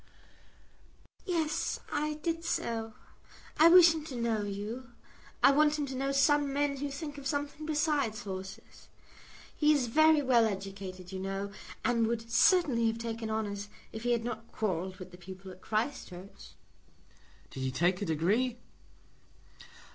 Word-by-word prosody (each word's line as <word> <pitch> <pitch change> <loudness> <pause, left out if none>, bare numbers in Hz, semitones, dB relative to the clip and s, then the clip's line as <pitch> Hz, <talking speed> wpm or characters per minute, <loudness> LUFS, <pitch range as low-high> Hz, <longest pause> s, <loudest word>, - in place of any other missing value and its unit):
"Yes; 320 -4 -1
I 300 0 -1
did 330 +2 -3
so. 225 -7 -2 0.6
I 320 - +9
wish 345 -1 +8
him 315 -2 -5
to 275 - -7
know 230 -2 0
you. 210 +5 -5 0.5
I - - +8
want 300 +1 +3
him 295 - -1
to 265 -1 -6
know 275 +1 -1
some 285 +1 +3
men 285 0 0
who 285 +1 -3
think 290 +1 -6
of 270 - -5
something 290 +2 -3
besides 295 -7 0
horses. 190 -1 -8 0.7
He 300 0 +4
is 285 -4 +3
very 310 +4 +4
well 245 -3 +4
educated, 195 -2 -6
you 190 - -5
know, 195 +1 -3 0.3
and 230 -2 +2
would 230 0 -3
certainly 265 -5 +4
have 225 0 0
taken 230 -1 -4
honours 205 -2 -3 0.2
if 220 - -7
he 245 +1 0
had 235 -1 0
not 230 -1 -6
quarrelled 185 -3 -2
with 185 -1 -10
the 180 - -12
people 190 +1 -10
at 185 0 -14
Christ 230 +6 -2
Church." 185 +2 -12 1.0
"Did - - -8
he 130 0 -1
take 175 +8 +1
a - - -1
degree?" 205 +11 +1
230 Hz, 155 wpm, -31 LUFS, 200-290 Hz, 1.0 s, I